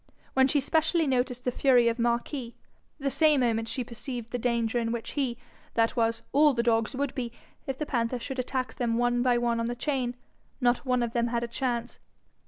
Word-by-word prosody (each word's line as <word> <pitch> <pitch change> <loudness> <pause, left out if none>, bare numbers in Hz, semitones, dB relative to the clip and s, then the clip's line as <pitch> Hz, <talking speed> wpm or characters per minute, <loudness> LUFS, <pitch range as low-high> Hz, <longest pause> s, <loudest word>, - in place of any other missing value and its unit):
When 265 0 +5
she 285 +2 +2
specially 320 +3 +2
noticed 250 -2 0
the 250 - +1
fury 245 -2 +4
of 230 +1 0
Marquis, 235 +1 -1 0.4
the 275 -1 -1
same 305 -3 +4
moment 225 -2 +1
she 250 - -1
perceived 240 0 -7
the 245 - -2
danger 235 0 0
in 230 -1 -1
which 235 -1 -4
he, 260 -5 -1 0.4
that 230 +1 +2
was, 230 -1 +1
all 295 -1 +5
the 235 - +1
dogs, 225 +1 +1
would 280 0 -1
be, 245 -4 -3 0.4
if 270 -1 -2
the 300 - -2
panther 240 -2 -1
should 260 +2 -5
attack 255 0 -2
them 230 -2 -1
one 245 0 +2
by 245 -1 +3
one 235 -1 +1
on 230 - -1
the 240 - -2
chain; 250 -2 -1 0.4
not 245 +2 +1
one 250 -1 +2
of 235 -1 -3
them 235 -1 +1
had 235 0 -1
a - - -2
chance. 240 0 -3
245 Hz, 210 wpm, -28 LUFS, 235-265 Hz, 0.4 s, When